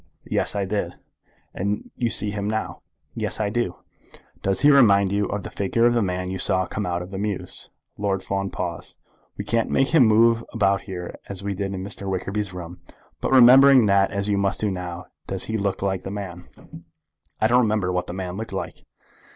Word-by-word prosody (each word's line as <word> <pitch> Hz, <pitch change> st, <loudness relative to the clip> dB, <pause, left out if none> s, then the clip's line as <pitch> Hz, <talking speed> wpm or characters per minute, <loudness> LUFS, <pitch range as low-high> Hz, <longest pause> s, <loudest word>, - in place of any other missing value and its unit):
"Yes; -, -, -1 dB
I 100 Hz, -1 st, 0 dB
did." 100 Hz, +2 st, -3 dB, 0.6 s
"And 100 Hz, +3 st, -3 dB
you 120 Hz, -2 st, -1 dB
see 105 Hz, -2 st, +4 dB
him 100 Hz, 0 st, -3 dB
now." 110 Hz, 0 st, -3 dB, 0.3 s
"Yes, -, -, -2 dB
I 105 Hz, -2 st, 0 dB
do." 115 Hz, -6 st, -1 dB, 0.7 s
"Does 95 Hz, -1 st, 0 dB
he 145 Hz, +1 st, +6 dB
remind 100 Hz, -8 st, +5 dB
you 100 Hz, 0 st, 0 dB
of 105 Hz, -2 st, -4 dB
the -, -, -7 dB
figure 110 Hz, +4 st, +1 dB
of 120 Hz, -, +4 dB
the 120 Hz, -, +2 dB
man 90 Hz, -1 st, -2 dB
you 95 Hz, -, -4 dB
saw 95 Hz, -2 st, +2 dB
come 100 Hz, +2 st, -4 dB
out 90 Hz, 0 st, -2 dB
of 90 Hz, -, -11 dB
the 95 Hz, -, -5 dB
mews?" 105 Hz, -2 st, -3 dB, 0.3 s
Lord 100 Hz, -2 st, -1 dB
Fawn 100 Hz, 0 st, -2 dB
paused. 85 Hz, -4 st, -5 dB, 0.4 s
"We -, -, -5 dB
can't 115 Hz, -1 st, 0 dB
make 135 Hz, +1 st, +2 dB
him 145 Hz, -8 st, +5 dB
move 115 Hz, +1 st, +4 dB
about 100 Hz, -3 st, +2 dB
here 90 Hz, -2 st, -6 dB
as 100 Hz, 0 st, -5 dB
we 100 Hz, 0 st, -2 dB
did 100 Hz, 0 st, -3 dB
in 95 Hz, -, -5 dB
Mr. 100 Hz, 0 st, -6 dB
Wickerby's 100 Hz, +1 st, -2 dB
room; 90 Hz, -1 st, -8 dB, 0.4 s
but -, -, -2 dB
remembering 130 Hz, 0 st, +8 dB
that 100 Hz, -1 st, +3 dB
as 100 Hz, -1 st, -3 dB
you 100 Hz, -1 st, +1 dB
must 100 Hz, 0 st, 0 dB
do, 105 Hz, -2 st, 0 dB, 0.5 s
does 95 Hz, -1 st, -1 dB
he 110 Hz, -, -3 dB
look 100 Hz, -2 st, -1 dB
like 95 Hz, -1 st, -1 dB
the -, -, -7 dB
man?" 95 Hz, -3 st, -7 dB, 0.9 s
"I -, -, +2 dB
don't 120 Hz, +3 st, +4 dB
remember 105 Hz, -5 st, 0 dB
what 90 Hz, -1 st, -2 dB
the -, -, -5 dB
man 95 Hz, 0 st, -5 dB
looked 110 Hz, -2 st, -6 dB
like." 95 Hz, -, -5 dB
100 Hz, 205 wpm, -23 LUFS, 95-110 Hz, 0.9 s, remembering